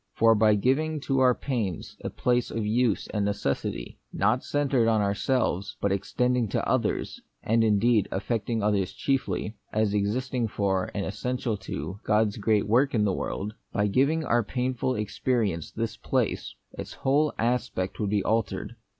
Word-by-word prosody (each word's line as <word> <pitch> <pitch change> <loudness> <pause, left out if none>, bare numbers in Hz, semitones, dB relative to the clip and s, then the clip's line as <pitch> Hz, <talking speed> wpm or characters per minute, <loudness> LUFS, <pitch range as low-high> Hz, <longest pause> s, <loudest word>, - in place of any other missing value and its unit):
For 115 0 +5
by 105 -1 +4
giving 150 +8 +1
to 135 -1 0
our 125 -2 +5
pains 110 - -3
a - - -2
place 125 -1 0
of 115 -2 -2
use 115 0 +1
and 105 - -1
of 100 0 0
necessity, 70 -6 -3
not 110 +6 +1
centred 140 -5 +1
on 110 -1 +3
ourselves, 100 -1 0
but 100 - 0
extending 125 +5 +1
to - - -1
others, - - -1 0.2
and 115 +1 +3
indeed 110 0 +3
affecting 110 +2 -1
others 100 -3 +1
chiefly, 130 -5 -1
as 110 -1 +1
exist 105 +6 -1
ing 120 -3 +1
for, 95 -3 0
and 100 - -1
essential 125 +3 -2
to, 95 0 -6
God's 105 -1 +2
great 105 -1 +1
work 125 +5 +3
in 105 -2 +3
the 100 - +1
world; 105 +3 -3
— - - -49
by 105 - +2
giving 140 +10 +2
to 155 - -5
our 120 0 +3
painful 130 +3 -1
ex 105 -1 -5
perience 105 - 0
this - - -3
place, - - -1 0.2
its - - -7
whole 145 +3 +2
aspect 120 -5 -1
would 105 - 0
be 100 -1 +1
altered. 110 0 -1
110 Hz, 175 wpm, -27 LUFS, 100-125 Hz, 0.2 s, For